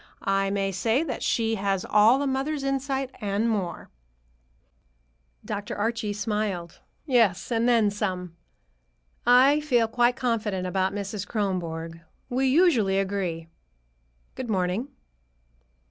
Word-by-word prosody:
I 195 Hz, 0 st, +1 dB
may 195 Hz, 0 st, -1 dB
say 225 Hz, -, +1 dB
that 325 Hz, -, -4 dB
she 225 Hz, -1 st, +1 dB
has 195 Hz, -1 st, -1 dB
all 225 Hz, +6 st, +5 dB
a -, -, -1 dB
mother's 275 Hz, +2 st, -1 dB
insight, 270 Hz, -1 st, -2 dB
and 205 Hz, +2 st, 0 dB
more." 200 Hz, -6 st, -3 dB, 1.5 s
Dr. 205 Hz, 0 st, -4 dB
Archie 225 Hz, 0 st, -1 dB
smiled. 205 Hz, -4 st, -3 dB, 0.3 s
"Yes, 230 Hz, -, +2 dB
and 230 Hz, +1 st, +2 dB
then 225 Hz, -4 st, +4 dB
some. 185 Hz, -4 st, -3 dB, 0.9 s
I 260 Hz, +4 st, +6 dB
feel 245 Hz, -7 st, +2 dB
quite 240 Hz, +2 st, +2 dB
confident 220 Hz, -7 st, -1 dB
about 190 Hz, +1 st, 0 dB
Mrs. 200 Hz, 0 st, -4 dB
Kronborg. 165 Hz, -5 st, -3 dB, 0.3 s
We 265 Hz, +2 st, +1 dB
usually 260 Hz, -, +3 dB
agree. 190 Hz, -4 st, -2 dB, 0.9 s
Good 255 Hz, -2 st, -6 dB
morning." 190 Hz, +4 st, 0 dB
210 Hz, 115 wpm, -26 LUFS, 195-245 Hz, 1.5 s, I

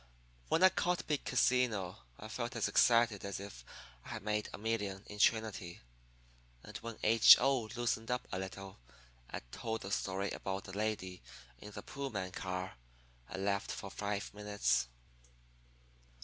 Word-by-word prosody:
When 165 Hz, -, +3 dB
I 185 Hz, -, +10 dB
caught 180 Hz, -1 st, 0 dB
big 150 Hz, -2 st, -1 dB
casino 120 Hz, -8 st, +2 dB, 0.2 s
I 110 Hz, -, -7 dB
felt 120 Hz, +2 st, -4 dB
as -, -, +1 dB
excited 115 Hz, -3 st, +4 dB
as 100 Hz, -1 st, -4 dB
if 100 Hz, -12 st, -9 dB, 0.4 s
I -, -, -12 dB
had -, -, -5 dB
made 105 Hz, 0 st, -1 dB
a -, -, -7 dB
million 105 Hz, -3 st, -2 dB
in 105 Hz, -, -9 dB
Trinity. 110 Hz, -5 st, +1 dB, 0.8 s
And -, -, -11 dB
when 115 Hz, -1 st, -7 dB
H. 115 Hz, +1 st, +9 dB
O. 130 Hz, -4 st, +2 dB
loosened 120 Hz, -1 st, -1 dB
up 125 Hz, 0 st, -1 dB
a 95 Hz, -, -2 dB
little 95 Hz, -1 st, -7 dB, 0.5 s
and -, -, -5 dB
told 115 Hz, -2 st, -3 dB
the 95 Hz, -, -6 dB
story 100 Hz, 0 st, -1 dB
about 95 Hz, 0 st, -3 dB
the 95 Hz, -, -9 dB
lady 105 Hz, -4 st, -2 dB, 0.4 s
in 105 Hz, -, -9 dB
the 105 Hz, -, -8 dB
Pullman 105 Hz, -10 st, -4 dB
car 90 Hz, -4 st, -4 dB, 0.5 s
I -, -, -5 dB
laughed 100 Hz, +2 st, 0 dB
for 100 Hz, -, -6 dB
five 100 Hz, -1 st, -3 dB
minutes. 105 Hz, -13 st, +1 dB
105 Hz, 155 wpm, -35 LUFS, 95-115 Hz, 0.8 s, I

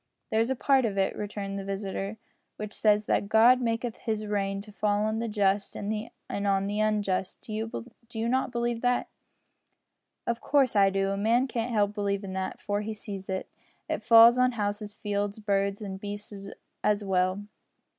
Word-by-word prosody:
"There's 225 Hz, +2 st, +2 dB
a 265 Hz, -, +1 dB
part 270 Hz, +1 st, +3 dB
of 210 Hz, -4 st, -1 dB
it," 190 Hz, 0 st, +1 dB
returned 200 Hz, -1 st, -4 dB
the -, -, -5 dB
visitor, 195 Hz, +1 st, -4 dB, 0.4 s
"which 210 Hz, 0 st, -6 dB
says 210 Hz, -1 st, +3 dB
that 200 Hz, -, 0 dB
God 240 Hz, +4 st, +6 dB
maketh 230 Hz, 0 st, -1 dB
his 215 Hz, -2 st, -2 dB
rain 195 Hz, -1 st, -1 dB
to 210 Hz, +1 st, -12 dB
fall 205 Hz, 0 st, +1 dB
on 215 Hz, +1 st, 0 dB
the 230 Hz, -, -2 dB
just 200 Hz, -2 st, +1 dB
and 215 Hz, +2 st, -3 dB, 0.4 s
on 195 Hz, 0 st, +2 dB
the 205 Hz, +1 st, -2 dB
unjust. 205 Hz, -3 st, 0 dB
Do 215 Hz, -, -8 dB, 0.6 s
you 225 Hz, -1 st, -2 dB
not 260 Hz, +1 st, +1 dB
believe 235 Hz, -1 st, -1 dB
that?" 245 Hz, 0 st, +1 dB, 1.2 s
"Of 235 Hz, 0 st, -1 dB
course 275 Hz, -5 st, +2 dB
I 195 Hz, -1 st, +6 dB
do. 195 Hz, 0 st, 0 dB
A 195 Hz, -, -2 dB
man 230 Hz, +5 st, +3 dB
can't 245 Hz, -2 st, -3 dB
help 205 Hz, -2 st, +2 dB
believin' 200 Hz, -2 st, -2 dB
that, 190 Hz, 0 st, -3 dB
for 205 Hz, 0 st, -2 dB
he 215 Hz, +1 st, -4 dB
sees 195 Hz, -2 st, -7 dB
it 190 Hz, 0 st, -2 dB, 0.4 s
it -, -, -3 dB
falls 230 Hz, +1 st, +8 dB
on 250 Hz, 0 st, +4 dB
houses, 205 Hz, -1 st, -3 dB
fields, 205 Hz, 0 st, -2 dB
birds 200 Hz, -1 st, 0 dB
and 190 Hz, -1 st, -5 dB
beasts 205 Hz, -1 st, -7 dB, 0.4 s
as 210 Hz, 0 st, +2 dB
well." 185 Hz, 0 st, +1 dB
210 Hz, 175 wpm, -28 LUFS, 200-225 Hz, 1.2 s, falls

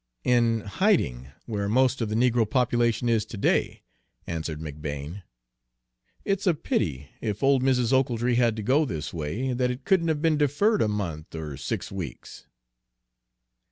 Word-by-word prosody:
"In 115 Hz, -2 st, +3 dB
hiding, 100 Hz, -, +1 dB, 0.2 s
where 100 Hz, -3 st, -2 dB
most 130 Hz, +3 st, +2 dB
of 110 Hz, -, -1 dB
the 105 Hz, -, -2 dB
negro 120 Hz, -2 st, +2 dB
population 120 Hz, -1 st, +1 dB
is 115 Hz, -2 st, +2 dB
to 110 Hz, -, -8 dB
day," -, -, 0 dB, 0.4 s
answered 80 Hz, -2 st, -4 dB
McBane. 75 Hz, +3 st, -6 dB, 1.0 s
"It's 195 Hz, 0 st, 0 dB
a 175 Hz, -, +4 dB
pity, 75 Hz, -, -2 dB
if 105 Hz, 0 st, -3 dB
old 135 Hz, -1 st, +4 dB
Mrs. 130 Hz, -2 st, +2 dB
Ochiltree 125 Hz, -2 st, +2 dB
had 120 Hz, -2 st, +3 dB
to 110 Hz, -, -5 dB
go 135 Hz, +8 st, +3 dB
this 80 Hz, -, -4 dB
way, 95 Hz, -, -2 dB
that 125 Hz, 0 st, +1 dB
it 125 Hz, +2 st, -5 dB
couldn't 185 Hz, -3 st, +3 dB
have 160 Hz, -2 st, +1 dB
been 155 Hz, -1 st, +2 dB
deferred 175 Hz, -, +2 dB
a -, -, +3 dB
month 85 Hz, -8 st, -4 dB
or 75 Hz, -3 st, -5 dB
six -, -, -4 dB
weeks." 90 Hz, -9 st, -8 dB
115 Hz, 160 wpm, -26 LUFS, 85-130 Hz, 1.0 s, a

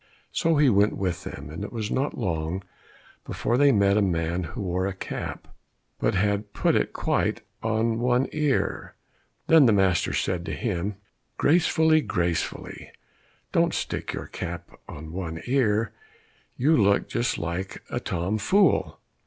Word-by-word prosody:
So 165 Hz, -1 st, +2 dB
he 145 Hz, -1 st, +5 dB
went 105 Hz, -3 st, +3 dB
with 90 Hz, -3 st, -2 dB
them, 70 Hz, +2 st, -7 dB
and 80 Hz, -, -6 dB
it -, -, -6 dB
was 110 Hz, -3 st, -4 dB
not 135 Hz, +3 st, -1 dB
long 90 Hz, -3 st, -2 dB, 0.6 s
before 120 Hz, -, -1 dB
they 140 Hz, +2 st, +5 dB
met 100 Hz, -3 st, +3 dB
a -, -, +4 dB
man 85 Hz, -1 st, 0 dB
who 80 Hz, -, -6 dB
wore 90 Hz, +1 st, -1 dB
a 100 Hz, -, -4 dB
cap, -, -, -6 dB, 0.5 s
but -, -, +1 dB
had 100 Hz, +2 st, 0 dB
put -, -, +2 dB
it -, -, +1 dB
quite -, -, 0 dB, 0.2 s
on 115 Hz, +1 st, 0 dB
one 125 Hz, +2 st, +2 dB
ear. 150 Hz, -3 st, -1 dB, 0.5 s
Then 160 Hz, -5 st, +6 dB
the -, -, +5 dB
master 95 Hz, -4 st, +2 dB
said 90 Hz, -2 st, -1 dB
to 80 Hz, -, -3 dB
him, 100 Hz, +1 st, -2 dB, 0.4 s
"Gracefully, 160 Hz, 0 st, +4 dB
gracefully, 85 Hz, -, -3 dB, 0.6 s
don't -, -, +2 dB
stick -, -, -3 dB
your -, -, -5 dB
cap 85 Hz, 0 st, -6 dB, 0.2 s
on 80 Hz, +2 st, -8 dB
one 85 Hz, -2 st, -4 dB
ear, 115 Hz, -4 st, +1 dB, 0.6 s
you 150 Hz, +6 st, +4 dB
look 100 Hz, -4 st, +3 dB
just 120 Hz, +1 st, -1 dB
like 85 Hz, +3 st, -4 dB
a -, -, -1 dB
tom 90 Hz, +6 st, -2 dB
fool!" 195 Hz, -, +2 dB
100 Hz, 155 wpm, -26 LUFS, 90-125 Hz, 0.6 s, Then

